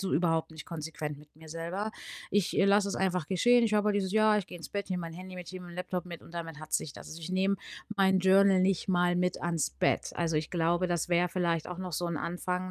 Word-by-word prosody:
so 195 -2 -2
überhaupt 165 -1 +1
nicht 155 -1 -9
konsequent 155 -3 -5
mit 150 0 -18
mir 160 0 -13
selber. 170 +6 -3 0.4
Ich, 205 -3 +1
äh, - - +5
lasse 200 0 +4
es 200 - -2
einfach 185 -4 0
geschehen. 240 +7 +4
Ich 215 -2 +1
habe 210 0 +3
halt 205 - +3
dieses: 190 -2 -1
„Ja, 215 0 +5
ich 195 - -4
gehe - - -9
ins 165 - -9
Bett, 200 -1 -3
nehme 180 -2 -2
mein 165 -1 -6
Handy 185 +2 -9
mit, 180 -2 -8
ich - - -8
nehme 185 -1 -8
mein 175 - -10
Laptop 180 0 -3
mit, 170 -2 -8
und - - -15
damit 165 -2 -6
hat 155 0 -11
sich 145 - 0
das.“ - - -11
Also, 160 - -8
ich 165 +2 -6
nehme 190 +2 +2 0.4
mein 190 -1 +4
Journal 190 0 +5
nicht 190 0 +1
mal 175 -1 +3
mit 180 0 0
ans 170 - 0
Bett. 65 - 0
Also, 165 -2 0
ich 155 0 -1
glaube, 170 +1 +1
das 175 -2 -1
wäre 175 0 +3
vielleicht 170 -2 0
auch 180 0 -6
noch 185 -1 -5
so 175 +3 -1
'n 170 -1 -2
Anfang, 180 +3 -3
180 Hz, 270 wpm, -30 LUFS, 165-190 Hz, 0.4 s, äh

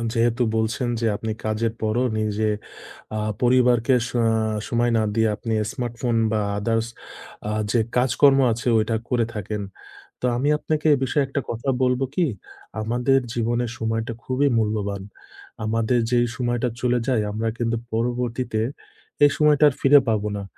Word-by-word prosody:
অ - - -3
যেহেতু 120 +1 +2
বলছেন, 115 +3 -1
যে, 115 - 0
আপনি 110 +1 -4
কাজের 110 +1 0
পরও 110 +3 +1
নিজে 110 0 0 0.7
আ - - -1 0.2
পরিবারকে 125 0 +4
স - - -8 0.6
সময় 120 0 +1
না - - +2
দিয়ে 110 0 +3
আপনি 115 0 -4 0.2
স্মার্টফোন 120 -1 -2 0.2
বা 110 - +1 0.2
আদারস 115 +2 0 0.6
আ - - -1 0.2
যে, 120 - +3 0.2
কাজকর্ম 135 +2 +4
আছে 120 +3 -3
ওইটা 110 +1 0
করে 120 -2 +1
থাকেন। 105 0 -4 0.6
তো - - -11
আমি 140 +4 0
আপনাকে 155 0 -2
এ - - +2
বিষয়ে 140 +2 +1
একটা 140 +1 -2
কথা 120 +4 -5
বলব 125 0 +2
কি? 175 0 +2 0.6
আমাদের 125 +4 +2 0.2
জীবনের 120 0 0
সময়টা 115 +1 -2
খুবই 135 +2 +1
মূল্যবান। 105 -2 -1 0.6
আমাদের 115 +2 +1
যেই 120 -1 +3
সময়টা 120 0 0
চলে 125 -1 +2
যায় 125 -5 +2
আমরা 115 +1 -1
কিন্তু 115 -1 0 0.2
পরবর্তীতে 120 0 -1 0.6
এই 145 - +6
সময়টা 150 -1 +4
আর 135 - -1
ফিরে 140 +1 +7
পাবো 105 -1 +1
না। 100 - -6
120 Hz, 155 wpm, -23 LUFS, 110-125 Hz, 0.7 s, ফিরে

